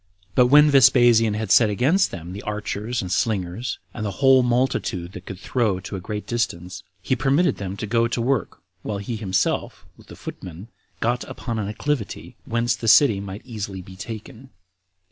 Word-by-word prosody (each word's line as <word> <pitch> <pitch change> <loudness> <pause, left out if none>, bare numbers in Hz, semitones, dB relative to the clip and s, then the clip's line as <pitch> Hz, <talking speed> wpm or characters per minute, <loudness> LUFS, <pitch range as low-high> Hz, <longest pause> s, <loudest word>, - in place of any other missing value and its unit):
But 125 +4 +5
when 150 +3 +6
Vespasian 120 -5 +5
had 110 -2 -3
set 115 -3 +6
against 145 - +2
them 85 0 -8
the 100 - -7
archers 105 +3 -3
and 90 - -6
slingers, 100 +2 -1 0.2
and 110 - -5
the 105 - -1
whole 135 -1 +6
multitude 120 -8 0
that 90 0 -11
could 95 - -6
throw 105 -2 0
to 95 - -7
a - - -4
great 105 +3 -5
distance, 90 -6 -3 0.2
he 130 - +1
permitted 140 +7 +2
them 100 0 -5
to - - -4
go 115 +2 +2
to 120 - -3
work, 120 -7 -1 0.2
while 105 - -4
he 100 +4 -4
himself, 95 -4 -1
with - - -18
the - - -11
footmen, 90 +4 -9 0.3
got 120 +2 0
upon 115 -2 -5
an 100 - -2
acclivity, 115 - -3
whence 115 +1 0
the 115 - -6
city 110 -3 +6
might 100 +1 -8
easily 100 -6 -6
be 95 +1 -12
taken. 115 +6 -9
110 Hz, 185 wpm, -23 LUFS, 95-125 Hz, 0.3 s, when